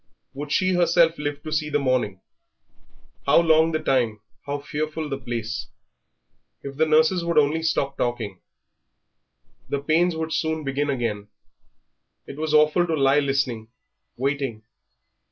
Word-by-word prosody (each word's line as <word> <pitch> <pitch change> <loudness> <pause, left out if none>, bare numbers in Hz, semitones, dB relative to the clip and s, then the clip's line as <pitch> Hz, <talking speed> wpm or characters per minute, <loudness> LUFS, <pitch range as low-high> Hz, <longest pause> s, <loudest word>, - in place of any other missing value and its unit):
Would 145 +1 -6
she 185 +2 +2
herself 170 -2 +3
live 145 -1 -4
to 155 - -6
see 155 0 -1
the 150 - +1
morning? 130 -8 0 1.1
How - - +6
long 160 -1 +4
the 155 - +1
time, 125 -8 0 0.3
how 145 0 -1
fearful 155 +2 -4
the 135 -1 -3
place! 120 -2 -4 1.0
If 140 0 -7
the 160 +1 +3
nurses 160 +3 +3
would 170 -1 -1
only 150 +2 +3
stop 140 -3 -1
talking.... 115 -6 -2 1.3
The 140 - -1
pains 165 +4 +2
would 160 0 -3
soon 160 -1 -1
begin 140 +1 -1
again.... 115 -6 -2 1.0
It 140 - -9
was 155 0 -2
awful 155 +3 +4
to 165 - 0
lie 135 0 +4
listening, 135 -5 -1 0.5
waiting. 135 -4 -2
145 Hz, 140 wpm, -24 LUFS, 135-160 Hz, 1.3 s, How